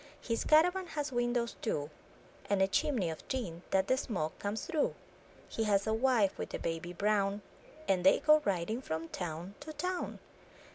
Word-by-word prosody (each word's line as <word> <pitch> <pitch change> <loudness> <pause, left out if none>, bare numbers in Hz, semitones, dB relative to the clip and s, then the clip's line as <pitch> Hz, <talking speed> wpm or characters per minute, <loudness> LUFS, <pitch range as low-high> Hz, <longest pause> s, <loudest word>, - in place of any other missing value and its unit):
His 230 -1 -1
caravan 360 +4 +4
has 295 -4 -3
windows 240 -1 0
two, 150 -8 -2 0.6
And 200 -1 +2
a 190 - +4
chimney 215 - +1
of 160 - -7
tin, 190 -11 -3
that 190 0 +2
the 260 - +3
smoke 180 - -3
comes 205 +2 -3
through; 320 -5 0 0.5
He 225 - -2
has 200 -1 +2
a 220 - +1
wife, 225 -4 +2
with - - -4
a - - -1
baby 165 +1 -3
brown. 200 +1 +1 0.4
And 185 -2 +2
they 190 - +6
go 305 0 +5
riding 200 +5 -1
from 160 -7 -4
town 175 +2 -5
to 300 +2 -8
town. 360 +3 -3
210 Hz, 175 wpm, -33 LUFS, 180-265 Hz, 0.6 s, they